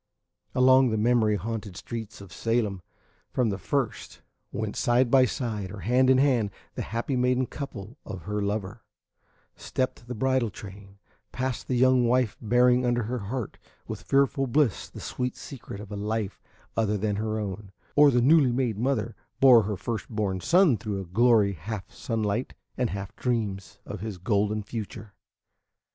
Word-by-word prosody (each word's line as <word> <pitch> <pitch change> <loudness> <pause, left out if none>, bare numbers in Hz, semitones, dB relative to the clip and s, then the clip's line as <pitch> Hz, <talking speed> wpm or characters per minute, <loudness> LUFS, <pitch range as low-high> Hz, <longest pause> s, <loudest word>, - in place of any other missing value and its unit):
Along 130 0 +6
the 110 - 0
memory 110 -1 +3
haunted 105 -3 -5
streets 115 -4 -7
of 100 -3 -12
Salem, 115 -5 -1 0.5
from 120 -4 +1
the 100 - -4
first, 135 +3 -3 0.3
went, - - -3
side 120 0 +2
by 130 -1 +6
side 110 -7 -3
or 105 -2 -8
hand 130 +3 +3
in 130 - +6
hand, 130 -6 +3 0.2
the - - -4
happy 115 +5 -2
maiden 125 0 +2
and 115 -6 -7 0.3
her 105 +1 -2
lover; 100 -1 -3 0.7
stepped 130 -2 -3
the 125 - -5
bridal 130 0 +1
train; 100 0 -11 0.3
passed 130 0 -3
the 130 - 0
young 130 -1 +4
wife 125 -2 +2
bearing 125 +2 +4
under 120 -1 +1
her 120 +3 -3
heart 115 +3 -5 0.3
with - - -6
fearful 135 0 +2
bliss 130 -3 +1
the - - -10
sweet 125 0 -3
secret 120 -7 -9
of 105 - -10
a - - -4
life 105 0 -3 0.3
other 105 -2 +1
than 105 0 -1
her 110 0 -2
own; 100 -1 -5 0.2
or 145 0 +7
the 125 -2 +3
newly 140 0 +5
made 120 -4 -1
mother 120 -3 -1 0.2
bore 125 -4 +8
her 105 -1 -3
first 110 -1 -4
born 105 -4 -1
son 170 - +4
through 105 -1 -4
a 95 - -5
glory 105 +2 +3
half 95 +3 -6
sunlight 110 +1 -2 0.2
and 125 -2 0
half 100 0 -6
dreams 105 -6 -2
of 105 - -6
his 110 -3 -5
golden 105 +2 0
future. 105 -1 -7
115 Hz, 165 wpm, -27 LUFS, 105-125 Hz, 0.7 s, bore